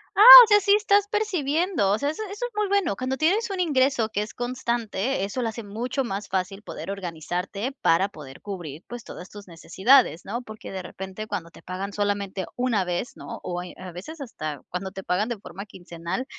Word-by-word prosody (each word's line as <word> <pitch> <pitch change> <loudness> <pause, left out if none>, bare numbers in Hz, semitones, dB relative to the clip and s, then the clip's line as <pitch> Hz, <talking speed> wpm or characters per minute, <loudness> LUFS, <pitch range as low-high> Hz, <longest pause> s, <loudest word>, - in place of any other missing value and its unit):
¡Ah!, 400 - +3 0.2
o - - +2
sea, 415 -1 +6
sí 400 0 +3
estás 410 -1 +3
percibiendo. 360 - 0
O 205 - +2
sea, 285 +5 -1
eso 310 +8 -5
eso 415 +5 -4
es - - -6
muy 420 -1 0
bueno. 395 -4 +1
Cuando 255 +1 -2
tienes 395 +10 +1
un 380 -2 -2
ingreso 265 -7 +2
que 205 -2 -2
es 210 - -6
constante, 240 -2 -2
eso 205 +6 -3
lo 235 - -1
hace 225 +1 -5
mucho 240 +6 -3
más 200 -3 -4
fácil, 195 +2 -3
poder 195 - -7
organizarte, 185 - -4
para 180 +5 +3
poder 140 -7 -12
cubrir, 175 -6 -7
pues, 240 0 -8
todas 180 - -10
tus 205 -1 -12
necesidades, 190 - +2
¿no? 235 +5 -4
Porque 215 -3 -10
de 190 -1 -5
repente, 190 +4 -7
cuando 170 -5 -4
te - - -16
pagan, 195 +2 -6
solamente 200 -2 -2
una 245 -6 +1
vez, 180 +6 -3
¿no? - - -8
O 175 0 -3
Eh, 180 - -10
a 185 0 -8
veces, 310 - -9
hasta 155 - -6
cuando 190 +2 -4
te 195 0 -8
pagan 195 +6 0
de 235 - -3
forma 195 0 -9
quincenal, 175 +3 -6
210 Hz, 210 wpm, -25 LUFS, 185-270 Hz, 0.2 s, sea